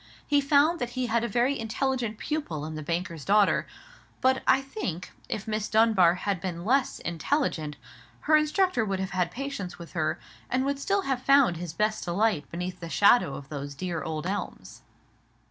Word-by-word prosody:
He 290 -1 +3
found 290 +4 +3
that 245 - -2
he 255 - +1
had 235 -1 +1
a - - 0
very 245 +5 +1
intelligent 230 0 -1
pupil 215 - -3
in 155 - -6
the 155 - -5
banker's 165 0 -3
daughter: 205 +3 +3 0.5
but 260 0 +2
I - - +6
think, 235 - -5 0.2
if 215 - -4
Miss 215 -1 -2
Dunbar 215 -6 +4
had 190 -1 -2
been 175 -1 -4
less 265 +4 +2
intelligent, 165 - -1 0.5
her 310 - +4
instructor 305 - +2
would 195 -3 -2
have 190 0 -3
had 180 -2 0
patience 250 -9 -5
with 170 -1 -11
her, 155 -3 -1 0.3
and 255 +2 +1
would 280 0 0
have - - -10
still 385 -8 0
found 260 -8 +4
his 170 -2 -6
best 215 +4 0
delight 180 -2 0
beneath 180 +1 -5
the 170 - -7
shadow 200 - +4
of 135 -1 -9
those 140 -1 -6
dear 170 +1 -3
old 155 +1 -4
elms. 200 +3 -5
210 Hz, 180 wpm, -27 LUFS, 170-265 Hz, 0.5 s, I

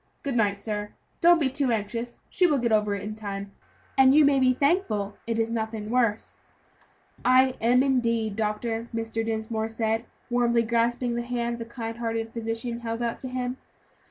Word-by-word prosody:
Good 275 -3 -2
night, 205 -3 +2
sir; 210 0 -4 0.3
don't 345 0 +7
be 290 - +2
too 265 -1 0
anxious, 230 +2 -3
she 365 - +3
will 295 -4 +2
get 235 -2 0
over 210 -1 +2
it 200 - -6
in 210 +1 -4
time, 200 -2 -6 0.4
and 265 0 +6
you 305 -1 +7
may 280 -1 +4
be 255 -1 +4
thankful 255 - 0
it 230 -1 -1
is 225 0 0
nothing 220 -1 -3
worse." 230 -4 0 0.8
"I 255 +1 +5
am, 245 +3 +4
indeed, 230 -5 +1
doctor," 225 +2 -2
Mr. 225 0 -2
Dinsmore 220 0 -2
said, 225 0 -1 0.3
warmly 240 -1 +3
grasping 235 +1 +1
the 240 - -1
hand 235 -1 -2
the 230 - -5
kind 230 -1 -6
hearted 225 -1 -2
physician 230 +1 -3
held 230 0 -3
out 235 -1 -2
to 260 - -6
him. 250 0 -3
230 Hz, 180 wpm, -26 LUFS, 220-250 Hz, 0.8 s, don't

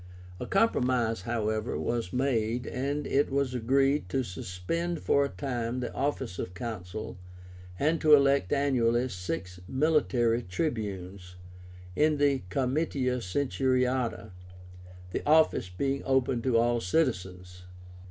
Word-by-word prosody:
A - - -5
compromise, 125 - +1
however, 110 +1 -2
was 115 -6 -2
made, 125 -2 0
and 140 +3 -2
it 140 +2 +1
was 135 -2 0
agreed 135 0 +1
to 130 +7 0
suspend 105 - -3
for 140 - +3
a 140 - -1
time 125 -3 -3
the 125 - -4
office 135 -8 -2
of 90 - -5
Consul, 110 -1 -6 0.6
and 155 - +1
to 155 -1 +8
elect 140 -8 +2
annually 130 -3 +2
six 90 -1 -5
MILITARY 130 -5 +2
TRIBUNES 95 - -4 0.6
in 150 0 +3
the 140 -2 +2
Comitia 130 - 0
Centuriáta, 125 -3 0 0.8
the - - -3
office 155 -10 +3
being 135 +9 -2
open 130 -2 +1
to 125 -1 +2
all 120 0 +2
citizens. 90 - -2
125 Hz, 120 wpm, -29 LUFS, 110-140 Hz, 0.8 s, to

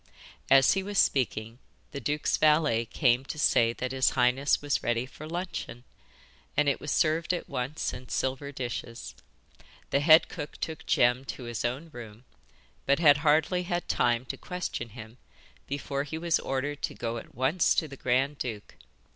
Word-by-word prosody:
As 135 -1 +6
he 195 - 0
was 200 +1 -5
speaking, 115 -5 +1 0.3
the 140 - -5
duke's 150 +4 0
valet 150 -7 +3
came 125 +1 +2
to 150 - -6
say 115 -5 +3
that 125 +1 -4
his 130 -1 +3
highness 125 +3 +3
was 145 -1 -1
ready 120 +1 0
for 150 +4 -11
luncheon, 170 -8 -5 0.7
and 150 - +3
it 140 - +1
was 145 - -5
served 160 +3 +1
at - - -6
once 130 +5 -3
in 125 0 -9
silver 135 +2 -2
dishes. 120 -3 -6 0.8
The 140 - +3
head 155 +2 +6
cook 145 - -7
took 160 -1 -5
Jem 125 +2 +3
to 130 - -7
his 120 -2 -4
own 135 +7 -3
room, 115 -1 -10 0.6
but 140 +1 +4
had 145 -4 +6
hardly 155 +4 +2
had 175 -1 -3
time 120 +1 +1
to - - -6
question 180 -10 -5
him 110 +2 -11 0.5
before 140 0 -3
he 150 +2 -6
was 170 0 +1
ordered 140 +2 -3
to - - -3
go 115 0 -3
at - - -15
once 135 +8 +2
to 160 - +1
the 140 - -10
grand 135 +3 0
duke. 110 -4 -6
135 Hz, 170 wpm, -28 LUFS, 120-155 Hz, 0.8 s, As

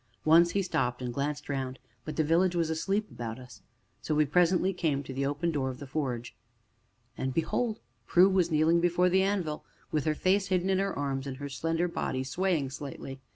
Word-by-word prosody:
Once 170 +2 +6
he 200 - +1
stopped 125 -8 -1
and 125 -1 -4
glanced 145 +2 -3
round, 130 -2 -3 0.3
but 155 - -5
the 160 - +2
village 175 +4 +2
was 165 -2 +1
asleep 195 +6 -1
about 115 -1 -5
us. 125 -4 -12 0.4
And - - -17
so 155 - +1
we 150 0 +4
presently 180 +5 +3
came 150 -6 0
to 135 - -7
the 135 +1 -1
open 150 +4 -1
doorway 135 -4 -1
of - - -12
the 140 - -8
forge. 130 -4 -3 0.8
And 130 -1 -3
behold! 220 +7 0 0.3
Prue 180 +2 +6
was 185 -3 +2
kneeling 160 +2 +3
before 175 +1 +3
the 190 +1 +3
anvil 190 -6 -1 0.3
with 150 -3 0
her 155 -1 +1
face 190 +4 +2
hidden 185 0 +1
in 190 - +2
her 195 -4 -1
arms, 140 -1 -2
and 130 -1 -5
her 140 0 -6
slender 165 +5 -1
body 130 -6 -2
swaying 155 -1 0
slightly. 135 -1 -7
155 Hz, 205 wpm, -29 LUFS, 135-180 Hz, 0.8 s, Once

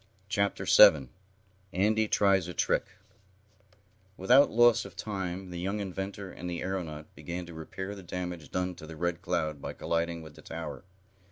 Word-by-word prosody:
Chapter 100 0 0
7 65 -5 +7 0.6
Andy 110 +4 +2
Tries 95 -4 +3
a 90 - -7
Trick - - +1 1.3
Without 125 +9 +6
loss 120 0 +5
of - - -11
time 95 -3 -4
the 90 - -5
young 100 +4 -2
inventor 95 0 -5
and 90 - -6
the 85 -1 -3
aeronaut 80 -5 -5
began 90 +1 -6
to 85 - -10
repair 95 +5 -6
the 100 - -9
damage 90 -3 -5
done 90 0 -1
to 80 -2 -10
the 80 - -8
Red 85 +1 -2
Cloud 80 -4 -1
by - - -5
colliding 85 0 -2
with 80 -1 -11
the - - -14
tower. - - -7
90 Hz, 165 wpm, -30 LUFS, 85-100 Hz, 1.3 s, 7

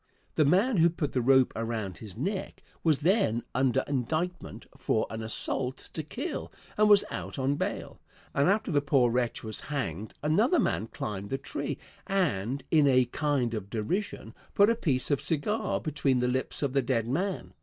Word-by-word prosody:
The 155 - +3
man 200 - +3
who 170 +1 +6
put 160 -4 -3
the 125 - 0
rope 130 +1 +4
around 110 -5 -3
his 105 -3 -10
neck 190 - -3 0.2
was 155 -3 +3
then 160 - +2
under 130 -1 +2
indictment 155 +7 -2
for 110 - 0
an 110 0 -4
assault 125 +4 -1
to 160 - -2
kill 255 - -5 0.2
and 210 0 +4
was 205 -1 +7
out - - -5
on 135 +1 +1
bail, - - -4 0.3
and 140 +5 +3
after 210 +2 +1
the 145 -2 +3
poor 135 -4 +3
wretch 120 -1 -1
was 110 -1 -4
hanged 110 - -4
another 210 - +3
man 110 - 0
climbed 100 -2 -5
the 135 - -1
tree 140 +1 -4 0.3
and, 140 - 0
in 150 -3 +5
a 130 -2 +5
kind 135 -2 0
of 105 -3 -4
derision, 120 - -3 0.2
put 205 +3 +6
a - - +1
piece 145 - 0
of 145 - +2
cigar 170 +8 0
between 140 -4 0
the 125 - +1
lips 130 +3 -1
of 135 -2 0
the 140 - +3
dead 115 -3 0
man. 180 +9 -2
140 Hz, 180 wpm, -29 LUFS, 120-170 Hz, 0.3 s, was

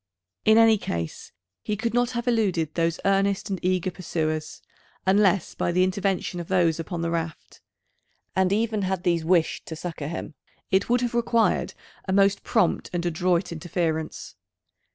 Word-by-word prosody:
In 220 +1 +6
any 225 -2 +6
case 85 - -5 0.3
he 210 - -3
could 230 +1 -2
not 245 0 +2
have 240 +1 -3
eluded 190 -10 +1
those 170 0 0
earnest 195 +1 +1
and 190 - -3
eager 185 0 +1
pursuers, 155 -3 -3 0.4
unless 195 -2 +3
by - - -1
the 180 +1 +3
intervention 190 -1 -1
of 170 - -6
those 170 -4 +2
upon 170 +1 -4
the 165 - -1
raft; 165 -2 -5 0.7
and 190 0 +2
even 215 0 +1
had 190 -1 -1
these 170 -2 +1
wished 165 -1 +1
to 160 - -5
succour 160 -3 -5
him, 165 0 -5 0.4
it 190 +3 +2
would 245 0 +3
have 240 -1 -1
required 235 -1 +1 0.3
a 190 - 0
most 200 0 +3
prompt 220 - +1
and 175 0 -2
adroit 175 +1 +1
interference. 160 -1 -3
185 Hz, 160 wpm, -25 LUFS, 170-200 Hz, 0.7 s, In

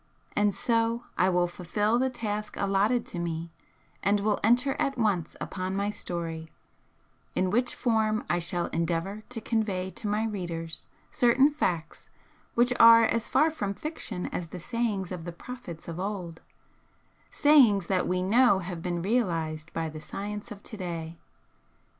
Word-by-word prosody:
And 205 0 +3
so 230 0 +1
I 185 - +3
will 175 -1 +2
fulfil 205 +6 0
the 260 +1 +2
task 215 -4 -4
allotted 200 +5 +2
to 175 - -6
me, 165 -1 -3 0.5
and 200 +2 +2
will 210 +1 +1
enter 245 +5 +3
at 275 -1 0
once 200 -8 0
upon 185 0 -3
my 200 +1 0
'story' 165 -4 -5 0.9
in 185 0 +1
which 245 +3 +1
form 220 -2 +1
I 175 - +1
shall 175 0 -1
endeavour 170 +5 -1
to 245 -2 -5
convey 205 -5 -1
to 215 - -6
my 210 +2 +1
readers 170 -6 -4 0.2
certain 260 +4 +4
facts 180 - -2 0.5
which 240 +1 +4
are 230 0 +9
as 230 0 +1
far 320 +1 +3
from 205 -10 -3
fiction 220 - -5
as 175 - -3
the 180 - -8
sayings 210 -2 -2
of 180 -3 -5
the 175 - -5
prophets 175 -2 -9
of 170 0 -5
old, 185 -4 -4 0.9
sayings 250 - +5
that 185 0 +1
we 180 0 0
know 230 +2 +5
have 175 -2 -5
been 175 -1 -2
realised 165 -8 -1
by 165 -1 -2
the 155 0 -8
science 210 +6 -6
of 205 -1 -9
to 215 - -8
day. 170 -3 -5
200 Hz, 160 wpm, -28 LUFS, 175-230 Hz, 0.9 s, are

